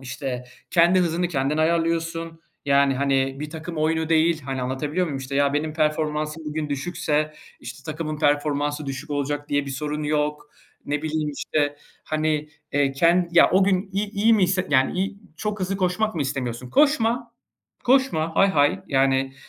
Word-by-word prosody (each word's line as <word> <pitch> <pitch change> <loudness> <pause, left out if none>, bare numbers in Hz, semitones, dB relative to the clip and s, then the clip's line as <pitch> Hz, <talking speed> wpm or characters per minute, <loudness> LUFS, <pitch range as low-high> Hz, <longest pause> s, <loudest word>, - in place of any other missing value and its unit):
İşte, 125 -1 -5 0.3
kendi 175 +2 +5
hızını 175 0 0
kendin 140 -2 0
ayarlıyorsun, 165 0 0 0.3
yani, 140 -1 +4
hani, 135 0 +1
bir 150 0 -5
takım 165 +2 -7
oyunu 160 +1 0
değil, 160 0 +3
hani, 135 -1 -4
anlatabiliyor 150 +7 -1
muyum? 140 -3 -4
İşte, 135 +1 -6
ya 140 0 +3
benim 155 +1 -1
performansım 155 0 -1
bugün 150 0 -3
düşükse, 150 +1 -1 0.3
işte, 140 - -9
takımın 155 -1 -4
performansı 145 0 0
düşük 135 +3 -6
olacak 145 0 -2
diye 145 0 0
bir 140 - -5
sorun 150 +2 -3
yok. 150 0 -1 0.4
Ne 145 +1 -2
bileyim, 155 -1 -1
işte, 145 0 -1 0.3
hani, 155 -1 -1 0.2
eee, 140 -1 +2
ken 170 +5 +3
ya 170 - +6
o 190 +1 +4
gün 190 0 0
i-i 200 +1 -1
iyi 220 +2 +3
hisset 185 -3 +1
yani, 130 -1 +4
i - - -8
iyi, 195 +1 -2 0.2
çok 210 0 -3
hızlı 190 +1 -1
koşmak 190 +3 0
mı 155 - 0
istemiyorsun? 125 -3 -4
Koşma, 240 - +2 0.5
koşma, 245 -12 +2
hay 195 - +5
hay. 145 -4 +2
Yani, 135 -1 +2
155 Hz, 165 wpm, -23 LUFS, 145-170 Hz, 0.5 s, ya